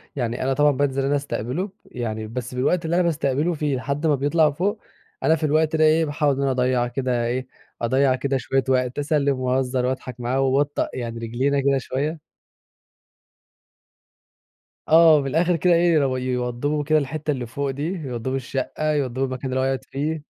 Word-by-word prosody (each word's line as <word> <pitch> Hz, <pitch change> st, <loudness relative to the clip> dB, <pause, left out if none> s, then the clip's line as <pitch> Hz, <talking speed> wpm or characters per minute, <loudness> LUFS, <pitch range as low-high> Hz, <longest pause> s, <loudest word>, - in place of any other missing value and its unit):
يعني 120 Hz, -3 st, -2 dB
أنا 135 Hz, +1 st, +1 dB
طبعًا 145 Hz, +2 st, +4 dB
بانزل 135 Hz, -1 st, 0 dB
أنا 140 Hz, +1 st, +1 dB
أستقبله، 140 Hz, -, -3 dB, 0.2 s
يعني 110 Hz, -3 st, -5 dB
بس 125 Hz, +2 st, -6 dB
بالوقت 165 Hz, +7 st, +1 dB
اللي 165 Hz, +1 st, 0 dB
أنا 180 Hz, -, +3 dB
باستقبله 155 Hz, 0 st, 0 dB
في 150 Hz, -3 st, -1 dB
لحد 140 Hz, +4 st, -2 dB
ما 150 Hz, -, +4 dB
بيطلع 150 Hz, +3 st, +2 dB
فوق 200 Hz, +8 st, -2 dB, 0.4 s
أنا 160 Hz, -, +4 dB
في 160 Hz, -, -6 dB
الوقت 155 Hz, +1 st, +2 dB
ده 155 Hz, -, +3 dB
إيه، 160 Hz, +1 st, +4 dB
باحاول 145 Hz, -1 st, +1 dB
إن 135 Hz, -, -3 dB
أنا 135 Hz, -1 st, +1 dB
أضيع 125 Hz, -1 st, +1 dB
كده 125 Hz, -1 st, -1 dB
إيه، 125 Hz, +2 st, -2 dB, 0.3 s
أضيع 130 Hz, +2 st, +2 dB
كده 135 Hz, +1 st, -1 dB
شويّة 135 Hz, +1 st, 0 dB
وقت، 125 Hz, 0 st, +1 dB
أسلم 145 Hz, -2 st, +1 dB
وأهزر 130 Hz, 0 st, 0 dB
وأضحك 125 Hz, -1 st, -4 dB
معاه 125 Hz, +2 st, -1 dB
وابطأ 140 Hz, +2 st, +1 dB
يعني 115 Hz, -2 st, -5 dB
رجلينا 125 Hz, +5 st, 0 dB
كده 140 Hz, 0 st, +2 dB
شويّة. 140 Hz, +5 st, -3 dB, 2.7 s
آه، 160 Hz, -2 st, +7 dB
من 135 Hz, -, -4 dB
الآخر 170 Hz, +5 st, +2 dB
كده 175 Hz, +2 st, +3 dB
إيه 170 Hz, 0 st, +4 dB
يو 135 Hz, -4 st, +2 dB
يوضبوا 125 Hz, +3 st, -1 dB
كده 155 Hz, +2 st, +3 dB
الحتّة 150 Hz, +2 st, -3 dB
اللي 130 Hz, -4 st, -3 dB
فوق 140 Hz, +4 st, -3 dB
دي، 135 Hz, +2 st, -4 dB
يوضبوا 130 Hz, -7 st, -4 dB
الشقّة 135 Hz, +3 st, -2 dB
يوضبوا 135 Hz, -2 st, -1 dB
المكان 130 Hz, 0 st, -4 dB
اللي 130 Hz, 0 st, -1 dB
هو -, -, +1 dB
هيقعد 135 Hz, 0 st, -1 dB
فيه. 150 Hz, +2 st, -3 dB
135 Hz, 180 wpm, -23 LUFS, 130-150 Hz, 2.7 s, آه